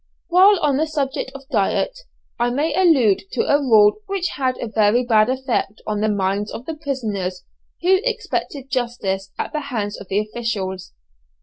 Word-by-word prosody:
While 375 +3 +6
on 280 -3 +2
the 315 +2 +1
subject 285 -4 -2
of 275 -1 -10
diet, - - 0 0.4
I 240 +1 +2
may 285 +6 0
allude 285 - +4
to - - +1
a 285 - +3
rule 220 -7 +5
which 390 -3 -1
had 255 -2 -1
a - - -4
very 220 +3 +2
bad 220 -1 +4
effect 255 -5 -1
on 210 -1 -2
the 215 - +2
minds 200 +1 -1
of 240 - -7
the 325 - -4
prisoners 215 - -4 0.4
who 375 +1 +4
expected 290 - -3
justice 200 -6 -2
at - - -4
the 305 - 0
hands 225 -8 -4
of 200 - -10
the 195 - -1
officials. 210 -4 -4
245 Hz, 175 wpm, -21 LUFS, 210-290 Hz, 0.4 s, While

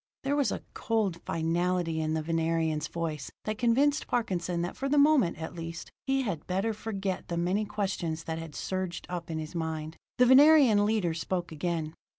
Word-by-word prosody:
There 275 +1 +1
was 285 -2 +2
a - - -4
cold 215 -7 -1
finality 165 0 0
in 155 0 0
the 160 - -1
Venerian's 165 -1 0
voice 160 -5 -4
that 215 0 -3
convinced 270 +5 +2
Parkinson 180 -7 -1
that 175 - -4
for 275 +1 -2
the 295 - +2
moment, 285 - +4
at 160 +2 -6
least, 165 -1 -7 0.2
he 270 0 +2
had 180 -10 -4
better 195 +5 0
forget 200 -3 -4
the 170 - -3
many 185 +5 +1
questions 185 -6 -2
that 160 0 -4
had 165 -3 -8
surged 185 -2 -3
up 175 -1 -4
in 160 - -3
his 155 +1 -5
mind. 160 -1 -4 0.2
The 250 - +6
Venerian 260 -5 +7
leader 210 -6 +1
spoke 175 +1 -3
again. 160 0 -2
175 Hz, 180 wpm, -29 LUFS, 165-220 Hz, 0.2 s, Venerian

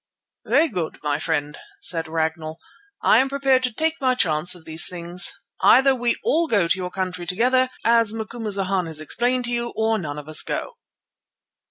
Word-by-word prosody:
"Very 330 - +4
good, 180 - -4
my 145 0 0
friend," 150 -2 -2 0.2
said 165 -2 -1
Ragnall, 160 0 -2 0.5
"I 220 - +5
am 265 +1 +2
prepared 270 -1 +2
to 250 -1 -1
take 320 +6 -1
my 255 -1 +2
chance 175 -4 +1
of 170 -2 -15
these 160 0 +2
things. 175 +1 -1 0.3
Either 270 +1 +6
we 245 -2 0
all 330 +3 +2
go 200 - +2
to - - +2
your 180 -1 -3
country 180 -1 -4
together, 255 +7 +2 0.2
as 230 -2 +4
Macumazana 205 -5 -2
has 160 -1 -4
explained 245 - -1
to 240 - -4
you, 235 0 -2
or 220 0 +1
none 150 -4 -5
of 150 0 -8
us 155 - +2
go." - - -4
195 Hz, 180 wpm, -22 LUFS, 165-245 Hz, 0.5 s, Either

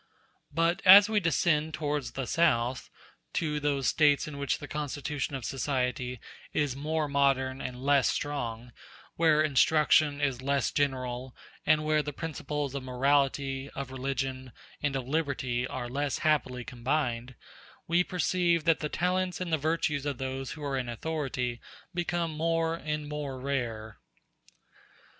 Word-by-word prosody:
But 165 +3 +1
as 200 +3 +10
we 215 -1 +3
descend 160 -3 +1
towards 145 -3 -2
the 135 - -3
South, 125 -6 +1 0.4
to 150 -2 -1
those 140 -3 0
States 145 -2 +3
in 140 -2 -7
which 140 -2 0
the 145 - -8
constitution 145 -1 -3
of 130 -4 -5
society 125 -2 -2 0.3
is 145 -4 0
more 155 +2 -1
modern 135 -2 +1
and 125 0 -6
less 140 -1 +4
strong, 120 -5 -3 0.4
where 155 -2 +4
instruction 150 0 +4
is 135 -4 0
less 140 +1 +1
general, 130 -3 -2 0.3
and 155 0 +4
where 155 0 +3
the 145 - -5
principles 150 -3 -4
of 140 - -3
morality, 135 +1 +1
of 135 -1 -5
religion, 130 -1 -3 0.3
and 145 -2 0
of 130 -2 -3
liberty 130 -5 -1
are 130 -3 -4
less 140 +3 -1
happily 130 -5 +1
combined, 125 -1 -2 0.5
we 170 +2 +3
perceive 175 -2 +1
that 165 -1 +3
the 150 - -3
talents 180 +2 0
and 180 -3 -3
the - - +4
virtues 150 -2 0
of 140 -3 -2
those 135 0 -4
who 155 - -9
are 135 -2 -1
in 125 -1 -4
authority 125 -2 -3 0.3
become 175 -1 -1
more 165 +1 0
and 150 -2 -3
more 145 -3 -4
rare. 120 - -3
140 Hz, 145 wpm, -29 LUFS, 130-155 Hz, 0.5 s, as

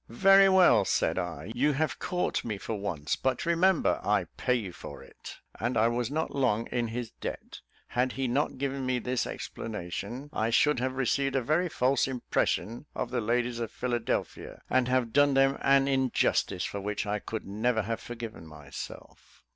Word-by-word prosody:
"Very 195 +10 +6
well," 180 - +6
said - - +1
I; 105 - -5
"you 145 +5 +2
have 155 +3 -1
caught 180 0 -1
me 110 -3 -3
for 110 - -5
once; 95 -8 -2
but 130 +2 -1
remember, 170 +1 +2
I - - +2
pay 125 - +1
you 105 -7 -3
for - - -10
it." - - -12 0.2
And 120 +3 -1
I 115 +2 +4
was 120 0 -1
not 155 +3 -2
long 120 -5 +1
in 120 -1 0
his 115 0 -5
debt. - - -7 0.3
Had 125 +1 0
he 135 -1 -1
not 135 +4 0
given 135 0 -2
me 130 -1 0
this 125 +1 -1
explanation, 110 - -6
I 110 +1 0
should 140 +3 +3
have 130 +1 -2
received 135 +1 +1
a 135 - +1
very 170 +8 +1
false 130 -2 +2
impression 125 0 -1
of 120 - -3
the 125 -2 0
ladies 120 +2 0
of 115 -2 -3
Philadelphia, 120 0 -3
and 130 -1 +3
have 125 -3 +1
done 145 -1 +4
them 135 0 +3
an 135 0 +4
injustice 130 -8 +1
for 100 - -4
which 105 +2 -2
I 105 0 -2
should 110 - -4
never 110 +3 0
have 115 +2 -3
forgiven 115 -8 -8
myself. 75 -2 -10
125 Hz, 180 wpm, -29 LUFS, 110-135 Hz, 0.3 s, Very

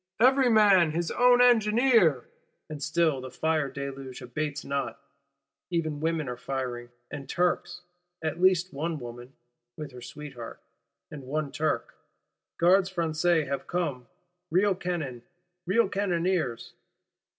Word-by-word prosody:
_ - - +8
Every 265 -1 +3
man 195 -8 +5
his 170 +1 -1
own 245 0 +5
engineer! 225 - +4 0.4
And 150 -2 -6
still 155 -2 +1
the 130 - -7
fire 155 +2 0
deluge 135 -1 -7
abates 150 +4 -4
not; 140 0 -3 0.7
even 160 -4 -1
women 160 -2 -1
are 125 -1 -4
firing, 125 -2 -4 0.2
and 140 -1 -7
Turks; 180 0 0 0.4
at 160 +2 -3
least 185 -2 +3
one 160 +3 -2
woman 120 +1 -9 0.4
(with 150 -2 -7
her 125 -1 -11
sweetheart), 125 -2 -9 0.5
and 150 - -8
one 150 0 -2
Turk. 150 -6 -1 0.7
Gardes 185 +2 +4
Françaises 165 -2 +1
have 135 0 -4
come: 150 -9 -2 0.4
real 190 +4 +3
cannon, 165 -9 -4 0.5
real 215 +3 +3
cannoneers. 180 - -1
155 Hz, 130 wpm, -27 LUFS, 135-180 Hz, 0.7 s, _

